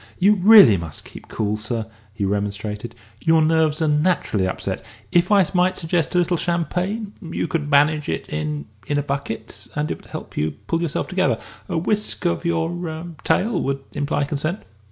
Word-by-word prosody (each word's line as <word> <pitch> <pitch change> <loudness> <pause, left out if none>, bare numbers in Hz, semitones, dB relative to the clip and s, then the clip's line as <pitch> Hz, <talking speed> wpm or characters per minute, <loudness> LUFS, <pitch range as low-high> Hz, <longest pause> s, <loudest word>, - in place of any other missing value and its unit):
"You 200 +3 +5
really 200 - +8
must 85 -3 -7
keep - - -12
cool, 105 -1 -1
sir," 110 +1 -3 0.3
he 100 -1 -2
remonstrated; 105 +3 -3 0.3
"your 160 0 +5
nerves 160 0 +2
are - - +2
naturally 150 - +1
upset. 95 - -3 0.3
If 175 +3 +3
I 200 -3 +6
might 180 0 +2
suggest 165 0 0
a - - +4
little 175 0 +2
champagne 180 +6 -1
you 170 -2 -3
could 150 -3 -2
manage 150 +1 +3
it 80 - -3
in 75 -1 -3 0.2
in 145 - 0
a 145 - +1
bucket, 135 -5 -5
and 150 +1 -1
it - - -3
would - - -19
help - - -8
you 75 +1 0
to - - -12
pull 165 0 0
yourself 165 -4 -1
together. 185 0 +1 0.3
A - - -1
whisk 205 +3 -1
of 175 - 0
your 170 -1 0 0.2
er 160 +2 -6
tail 205 -3 +1
would 135 0 -2
imply 145 0 0
consent." 155 +6 -2
155 Hz, 185 wpm, -22 LUFS, 115-175 Hz, 0.3 s, really